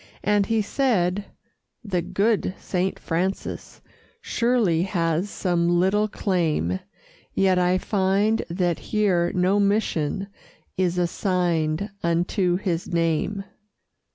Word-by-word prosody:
And 205 0 +2
he 225 -1 +1
said: 200 -6 +1 0.6
"The 190 -5 -1
good 200 +1 0
Saint 185 0 -2
Francis 180 +4 -3 0.4
Surely 230 -9 +1
has 175 0 0
some 175 -3 0
little 205 +4 +2
claim, 160 - 0 0.6
Yet 190 -1 +3
I 180 +1 +3
find 200 +3 +1
that 175 -1 0
here 190 -5 +1
no 185 +3 +3
mission 200 -3 0 0.5
Is 180 -1 0
assigned 175 0 0
unto 175 +2 +1
his 180 -3 -2
name." 170 +4 0
185 Hz, 100 wpm, -24 LUFS, 170-205 Hz, 0.6 s, Yet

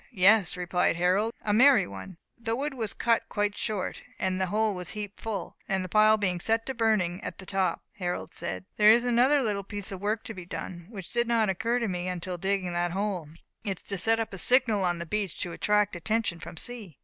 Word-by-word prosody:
"Yes," 195 -1 +5
replied 180 -1 +1
Harold, 185 +6 +2
"a 210 - +1
merry 265 +5 +6
one." 100 - -9 0.2
The 230 -1 -2
wood 285 +3 -2
was 225 -6 -3
cut 230 -1 +2
quite 205 -1 0
short, 210 -5 -3 0.2
and 185 0 -1
the 190 - +1
hole 215 +2 +1
was 180 -2 -5
heaped 205 -1 -6
full; 220 -3 -5
and 190 -1 0
the - - -7
pile 215 +2 +5
being 185 -4 0
set 225 +5 +1
to 265 - -3
burning 215 -6 +1
at - - -5
the 190 - -11
top, 190 -2 0 0.2
Harold 180 -1 -3
said, 95 +2 -4
"There 210 0 +7
is 235 +2 +6
another 255 +4 +4
little 205 -3 -1
piece 200 0 -5
of 190 -1 -6
work 210 +2 -1
to 225 - -7
be 185 -3 -8
done, 175 0 -7
which 195 -6 -9
did 235 0 +1
not 230 -3 +2
occur 225 +6 0
to 235 -2 0
me 180 -2 -3
until 180 0 -4
digging 190 -1 -1
that 175 0 0
hole. 190 -5 -2 0.3
It 195 -4 -2
is - - -18
to 200 - -2
set 225 +4 +3
up 225 -2 -3
a 195 - -5
signal 240 -3 +3
on 175 -1 +1
the 170 - -5
beach 200 +1 -2
to 175 - -3
attract 210 +2 +1
attention 200 0 -1
from 170 +1 -9
sea." 215 - -4
200 Hz, 230 wpm, -28 LUFS, 180-225 Hz, 0.3 s, There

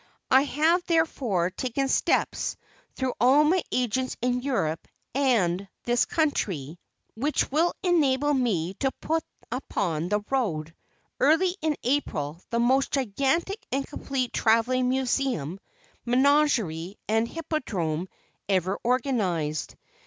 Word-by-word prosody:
I 265 - +7
have, 325 +5 +2
therefore, 250 - +1
taken 260 +5 -2
steps, - - +1 0.4
through 260 -2 -1
all 265 +5 +6
my 345 +4 +3
agents 255 +1 -1
in 250 +1 0
Europe 195 - -1 0.3
and 200 -9 +1 0.2
this 240 0 +2
country, 180 - -1 0.3
which 285 +6 0
will 325 +5 +2
enable 295 -5 +3
me 195 - 0
to 270 - +2
put 320 0 -1 0.3
upon 180 - -2
the 210 +1 +1
road, 165 - -1 0.5
early 325 +6 +3
in 310 -2 0
April, 170 - -1
the 235 - 0
most 260 +3 +3
gigantic 275 - 0
and 270 +1 0
complete 265 -3 -3
travelling 245 +3 +2
museum, 255 - -1 0.4
menagerie 245 - +2
and 225 +2 +2
hippodrome 195 - -3 0.4
ever 190 0 +1
organized. 205 - 0
255 Hz, 115 wpm, -26 LUFS, 190-285 Hz, 0.5 s, I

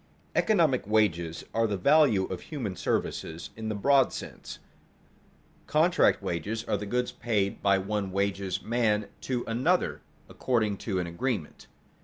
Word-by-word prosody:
_Economic 160 - +2
wages 85 -6 +1
are 115 0 +2
the 100 -2 -2
value 135 - +4
of 95 - -6
human 120 -11 -5
services 80 -1 -3
in 110 0 -5
the 110 - -2
broad 135 +5 +4
sense; - - -8 1.1
contract - - +3
wages 105 +7 -3
are - - -1
the 105 +1 -4
goods 125 +3 -1
paid 105 -4 -1
by 100 -1 +4
one 100 0 -2
wages 100 -1 -1
man 110 -3 +1
to 125 -2 -2
another 130 +11 +1 0.3
according 110 -5 0
to 100 -1 -3
an 90 - -1
agreement. 85 - -4
105 Hz, 140 wpm, -28 LUFS, 95-125 Hz, 1.1 s, value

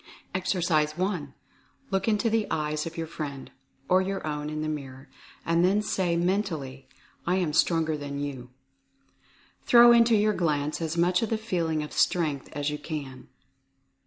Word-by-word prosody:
Exercise 170 -5 +1
i. 185 -6 -1 0.6
Look 195 +1 0
into 215 +1 +2
the 225 -1 +1
eyes 155 0 -2
of 165 - -8
your 165 - -2
friend 150 -4 -7 0.4
(or 185 +1 +4
your 195 -1 -3
own 150 -1 -3
in 155 0 -3
the - - -2
mirror) 135 -3 -6 0.4
and 170 +1 +2
then 200 +3 +3
say 180 -4 0
mentally 170 -8 -2 0.4
"I 180 - +2
am 175 -5 0
Stronger 160 -1 +2
than 145 -1 -5
you." 135 -3 -5 1.2
Throw 240 0 +8
into 235 -1 +5
your 210 0 +3
glance 150 -4 -1
as 165 +1 -2
much 175 +1 +3
of 225 - -1
the 225 - 0
feeling 170 -8 -1
of 150 - -8
Strength 155 -6 +1
as 145 0 -2
you 150 - -4
can. 140 -5 -7
165 Hz, 160 wpm, -27 LUFS, 150-190 Hz, 1.2 s, Throw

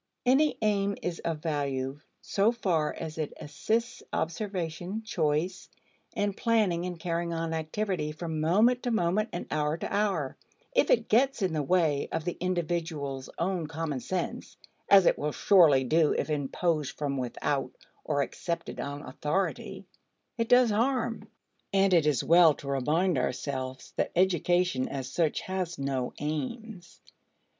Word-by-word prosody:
Any 275 +5 +4
aim 200 -1 +1
is 175 -1 -3
of 160 -2 -3
value 140 -3 -2 0.2
so 205 +3 +2
far 175 -10 0
as 160 0 -7
it 155 - -3
assists 175 +10 -2
observation, 180 +2 -3
choice, 175 -1 -1 0.5
and 205 -1 0
planning 210 -7 +1
in 180 -1 -4
carrying 170 0 -2
on 165 0 -2
activity 160 0 -2
from 160 0 -4
moment 220 +10 +3
to 245 - -2
moment 215 0 +1
and 175 - -4
hour 150 +1 0
to - - -5
hour; 195 -10 0 0.4
if - - +3
it - - +3
gets 250 0 +3
in 180 -3 0
the 155 - 0
way 155 -2 +1
of 160 0 -2
the 175 - -2
individual's 165 -6 -2
own 175 -2 -1
common 155 -3 -3
sense 185 +7 -4 0.3
(as 195 -2 +8
it - - +3
will 150 0 -1
surely 160 -9 +5
do 155 +4 +3
if - - -2
imposed 150 +1 -1
from 140 -2 -2
without 130 +2 -2 0.3
or 145 -2 +1
accepted 170 +3 -5
on 145 +1 -5
authority) 150 +8 -3 0.5
it 230 0 -2
does 245 -2 +6
harm. 235 +1 0 0.5
And 195 -1 +4
it 165 -4 +4
is 145 -5 +2
well 165 -2 +6
to 140 - -11
remind 150 +5 +1
ourselves 130 0 -4
that - - 0
education 175 -5 +2
as 135 -1 -5
such 165 -3 0
has 185 -3 -3
no 135 -2 -2
aims. 170 - -5
170 Hz, 150 wpm, -29 LUFS, 150-195 Hz, 0.5 s, as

